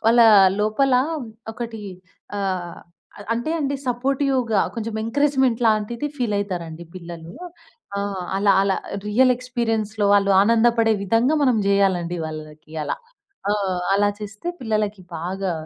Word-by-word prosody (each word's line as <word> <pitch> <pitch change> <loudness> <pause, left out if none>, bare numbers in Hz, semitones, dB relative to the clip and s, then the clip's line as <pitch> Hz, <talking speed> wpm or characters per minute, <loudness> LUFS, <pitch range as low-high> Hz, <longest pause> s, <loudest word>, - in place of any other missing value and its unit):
వాళ్ళా 230 0 +6 0.4
లోపలా 250 +4 +3 0.5
ఒకటీ 230 -2 -6 0.6
ఆహ్, 185 -3 -3 0.4
అ - - -10
అంటే 240 +6 -2
అండి 280 -1 -1
సపోర్టివ్‌గా 255 -3 +1
కొంచం 225 -1 -4
ఎంకరేజ్‌మెంట్ 265 0 +1
లాంటిది 220 +5 0
ఫీలయితారండి 190 - -3
పిల్లలూ. 170 -2 -9 0.7
ఆహ్, 200 -2 -3
అలా 200 0 +4
అలా 195 -1 +1 0.3
రియల్ 250 +5 +4
ఎక్స్‌పీరియన్స్‌లో 225 -4 -1
వాళ్ళు 200 -1 +4
ఆనందపడే 230 +1 +4
విధంగా 230 +9 +2
మనం 255 -4 +3
జెయ్యాలండి 190 -3 +2
వాళ్ళకి 155 0 -9
అలా. 145 - -2 0.5
ఆ! - - +3 0.4
అలా 205 +1 +3
చేస్తే 210 +10 -6
పిల్లలకి 215 -4 -1
బాగా 185 +2 -3
215 Hz, 115 wpm, -22 LUFS, 195-240 Hz, 0.7 s, వాళ్ళా